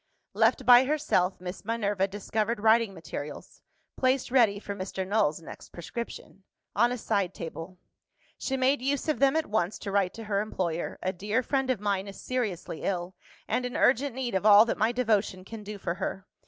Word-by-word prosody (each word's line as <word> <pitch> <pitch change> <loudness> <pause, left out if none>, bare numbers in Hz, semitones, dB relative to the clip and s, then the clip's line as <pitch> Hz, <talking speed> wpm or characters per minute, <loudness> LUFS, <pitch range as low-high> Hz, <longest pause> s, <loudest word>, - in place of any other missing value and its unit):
Left 260 - +2
by 245 +2 +8
herself, 270 -11 +1
Miss 180 +1 -7
Minerva 205 -3 0
discovered 210 +3 -2
writing 220 0 +4
materials 150 -3 -8 0.4
(placed 260 -1 +1
ready 230 -6 +4
for 200 0 -6
Mr. 190 -1 -5
Null's 200 -7 +1
next - - -11
prescription) 195 +2 -8 0.3
on 235 +4 +4
a 250 - -2
side 200 -5 -1
table. 165 +2 -7 0.6
She 265 - -2
made 260 +1 +2
use 275 +4 -1
of 310 - 0
them 275 +1 +4
at 320 -1 +1
once 205 -2 -1
to 200 - -6
write 195 -2 +1
to 225 - -7
her 205 -2 0
employer. 175 -6 -3
"A 185 - -1
dear 210 +7 -1
friend 270 0 0
of 255 -5 +1
mine 200 -1 -1
is 195 - -9
seriously 215 -10 -3
ill, 180 -1 -2 0.3
and 250 - 0
in 250 0 -3
urgent 265 0 +2
need 255 -3 -3
of 190 - 0
all 210 +1 +8
that 235 - -2
my 220 +3 +3
devotion 215 -6 0
can 225 +2 -8
do 210 0 -7
for 170 - -3
her. 190 +1 -4
210 Hz, 190 wpm, -28 LUFS, 190-245 Hz, 0.6 s, by